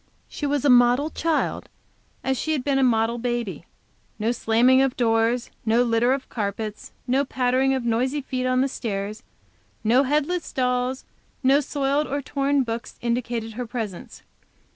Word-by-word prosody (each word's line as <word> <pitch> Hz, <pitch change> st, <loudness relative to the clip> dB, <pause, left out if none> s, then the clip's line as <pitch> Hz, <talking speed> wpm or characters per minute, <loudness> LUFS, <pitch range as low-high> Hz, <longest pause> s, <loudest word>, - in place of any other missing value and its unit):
She 290 Hz, -, -4 dB
was 285 Hz, -1 st, 0 dB
a -, -, +5 dB
model 245 Hz, +5 st, +4 dB
child, 325 Hz, -1 st, -1 dB, 0.5 s
as 265 Hz, -, 0 dB
she 315 Hz, +5 st, -1 dB
had 280 Hz, -5 st, -1 dB
been 275 Hz, -1 st, +1 dB
a -, -, +3 dB
model 235 Hz, -1 st, +2 dB
baby. 240 Hz, -4 st, -3 dB, 0.5 s
No 225 Hz, +2 st, 0 dB
slamming 245 Hz, +3 st, +3 dB
of 270 Hz, -2 st, 0 dB
doors, 230 Hz, 0 st, +1 dB
no 230 Hz, +2 st, +3 dB
litter 235 Hz, +1 st, +2 dB
of 270 Hz, 0 st, -1 dB
carpets, 210 Hz, 0 st, -4 dB
no 265 Hz, +2 st, +2 dB
pattering 260 Hz, 0 st, +1 dB
of 255 Hz, -2 st, -3 dB
noisy 250 Hz, +5 st, 0 dB
feet 255 Hz, -1 st, -3 dB
on 255 Hz, 0 st, +2 dB
the 270 Hz, -, +2 dB
stairs, 210 Hz, -4 st, -4 dB, 0.6 s
no 235 Hz, +4 st, +4 dB
headless 300 Hz, +5 st, 0 dB
dolls, 250 Hz, 0 st, -1 dB, 0.4 s
no 270 Hz, +2 st, +5 dB
soiled 285 Hz, +1 st, 0 dB
or 285 Hz, +2 st, -2 dB
torn 280 Hz, 0 st, 0 dB
books 230 Hz, -1 st, -5 dB
indicated 235 Hz, -1 st, -2 dB
her 245 Hz, +2 st, -5 dB
presence. 220 Hz, -6 st, -6 dB
250 Hz, 160 wpm, -24 LUFS, 230-270 Hz, 0.6 s, a